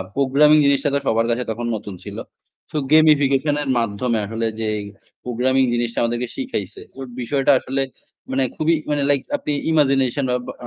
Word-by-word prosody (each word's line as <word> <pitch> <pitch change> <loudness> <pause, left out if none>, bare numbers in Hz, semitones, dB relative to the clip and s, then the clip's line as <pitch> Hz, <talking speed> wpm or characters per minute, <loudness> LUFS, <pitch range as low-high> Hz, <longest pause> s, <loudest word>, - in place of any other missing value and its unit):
Programming 140 +3 +4
জিনিসটা 140 0 +2
তো - - +2
সবার 115 +1 +2
কাছে 125 +2 -1
তখন 120 +2 -4
নতুন 100 -2 -7
ছিল। - - -8 0.5
তো 155 - -3
গেমিফিকেশন 145 -2 +4
এর 135 - -5
মাধ্যমে 115 +1 -1
আসলে 115 +2 -2
যে 110 - -1 0.6
প্রোগ্রামিং 130 +2 +1
জিনিসটা 120 -1 -1
আমাদেরকে 120 +1 -1
শিখাইছে। - - -5
তো - - -13 0.2
বিষয়টা 135 +3 +2
আসলে 135 +1 -2 0.5
মানে 135 0 +1
খুবই 160 +1 +2 0.2
মানে 145 -1 +1
লাইক 140 -2 +3 0.2
আপনি 150 - -4 0.2
ইমাজিনেশন 135 -3 +2 0.2
বা - - -5
135 Hz, 155 wpm, -21 LUFS, 120-145 Hz, 0.6 s, প্রোগ্রামিং